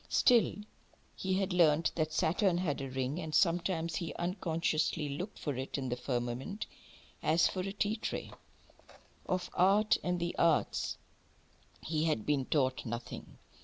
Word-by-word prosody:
Still, 240 -3 +4 0.6
he 190 0 -1
had 190 -1 0
learnt 165 -2 +4
that 155 -1 -1
Saturn 170 +4 +2
had 160 -6 -1
a 135 - -4
ring, 130 +4 -2
and 160 -3 -3
sometimes 170 -2 +2
he 170 - -4
unconsciously 165 -4 0
looked 175 +9 -5
for 145 -3 -3
it 130 +3 -4
in 130 -2 -3
the 125 - 0
firmament, 125 - -3 0.6
as 160 +2 +4
for 185 - -4
a 190 +1 -2
tea 205 +2 0
tray. - - -4 1.0
Of 185 -1 -1
art, 200 +4 +4
and 180 0 0
the 170 0 -2
arts, 165 -2 +2 0.9
he 155 0 0
had 150 -10 0
been 140 -3 +1
taught 130 -3 +1
nothing. 120 +1 -6
165 Hz, 150 wpm, -32 LUFS, 140-185 Hz, 1.0 s, Still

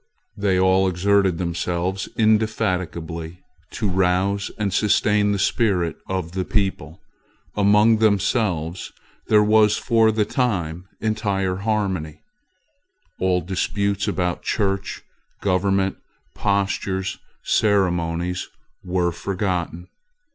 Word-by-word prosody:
They 95 -2 +1
all 95 +1 +4
exerted 95 0 +2
themselves 90 +2 -2
indefatigably 90 -6 -1 0.3
to 105 - -2
rouse 95 +1 +1
and 100 -3 -1
sustain 105 0 +2
the 100 - 0
spirit 95 -4 +1
of 95 -3 -3
the 95 +1 -2
people. 95 -5 -2 0.6
Among 105 +2 +4
themselves 95 -5 0 0.4
there 105 -1 +5
was 105 0 +4
for 115 -2 +3
the 110 -1 +1
time 90 - -2
entire 100 -4 -1
harmony. 95 -7 -2 1.0
All 90 -1 +1
disputes 100 +3 -1
about 90 -1 -1
church 100 -2 -2 0.4
government, 95 0 +1 0.4
postures, 95 -1 -1 0.2
ceremonies, 90 -3 0 0.3
were 90 -1 0
forgotten. 90 -1 -3
95 Hz, 95 wpm, -22 LUFS, 90-105 Hz, 1.0 s, there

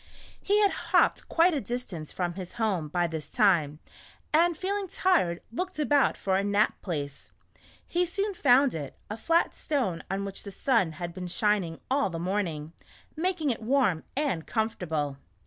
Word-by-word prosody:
He 410 +1 +2
had 405 -2 +4
hopped 345 +1 +1
quite 345 +2 +4
a 285 - 0
distance 205 -12 -5
from 175 -2 -2
his 185 -1 -7
home 200 -9 0
by 175 +3 0
this 160 -2 -5
time, 175 - +3 0.6
and 335 +1 +4
feeling 395 +3 -2
tired, 330 - +1
looked 370 +9 -4
about 290 -2 +3
for 190 -1 0
a 195 - +2
nap 205 +1 +1
place. 145 -6 -5 0.6
He 350 +1 +1
soon 400 +4 -2
found 275 -4 +4
it 145 -4 -5
— - - -37
a - - -2
flat 330 +9 +2
stone 225 - -1
on 195 +1 -2
which 195 -1 -7
the 200 - -8
sun 200 - +1
had 170 +2 -6
been 180 0 -5
shining 185 -3 0
all 275 -5 +2
the 165 - -5
morning, 170 -4 -2 0.4
making 325 -3 0
it 230 - -4
warm 225 - +2
and 270 - -1
comfortable. 160 - -1
210 Hz, 170 wpm, -28 LUFS, -, 0.6 s, had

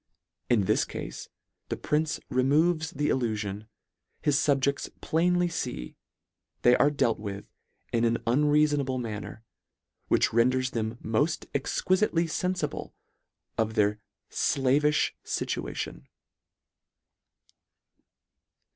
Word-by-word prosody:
In 120 -4 +4
this - - +2
cafe - - -6 0.6
the - - -2
prince 155 +1 0
removes 155 +5 +2
the 145 +2 -1
illuiion. 105 -4 -2 0.6
His 145 - +3
fubjedls 140 -1 +1
plainly 175 +2 +2
fee 125 - -4 0.7
they 120 0 +7
are 145 - +4
dealt 140 -6 +1
with 100 -1 -6 0.5
in 115 0 +2
an 115 0 +3
unreafonable 145 +1 +2
manner, 110 -1 -6 0.6
which - - +2
renders 125 +2 +2
them 110 0 -2
moil 115 +7 +2 0.3
exquifitely 175 +5 +1
fenfible 180 -2 -2 0.7
of 110 0 0
their 105 -1 +2 0.3
flavifh 145 +3 +2
fituation." 60 - -3
130 Hz, 95 wpm, -28 LUFS, 110-150 Hz, 0.7 s, they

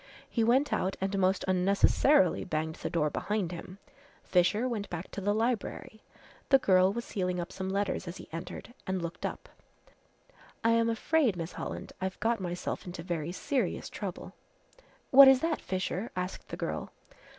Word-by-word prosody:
He 230 - 0
went 260 +6 +3
out 190 - 0
and 195 +1 -1
most 190 0 +2
unnecessarily 190 - +3
banged 160 0 -2
the - - -4
door 150 -3 +1
behind 205 -1 -1
him. 180 +2 -8 0.5
Fisher 200 +7 +2
went 220 -5 -3
back 175 +1 -6
to 200 - -5
the 205 +2 +1
library. 220 -1 -2 0.5
The 270 - +8
girl 185 -6 +4
was 235 +3 -4
sealing 180 -3 -2
up 175 +1 -4
some 190 0 -4
letters 195 -1 -1
as 170 +2 -6
he 175 - -10
entered 175 +8 -7
and 190 0 0
looked 170 0 -3
up. - - -8 1.2
"I 230 - +4
am 230 0 +3
afraid, 240 - +2
Miss 165 0 -4
Holland, - - -6
I've 190 0 -3
got 230 -1 +1
myself 180 0 -4
into 175 -1 -6
very 170 -2 -3
serious 260 +8 -2
trouble." - - -6 0.8
"What 275 +1 +11
is 265 -1 +7
that, 330 -1 0
Fisher!" 185 +3 -2
asked 180 +1 -4
the - - -6
girl. - - -3
190 Hz, 170 wpm, -30 LUFS, 180-230 Hz, 1.2 s, What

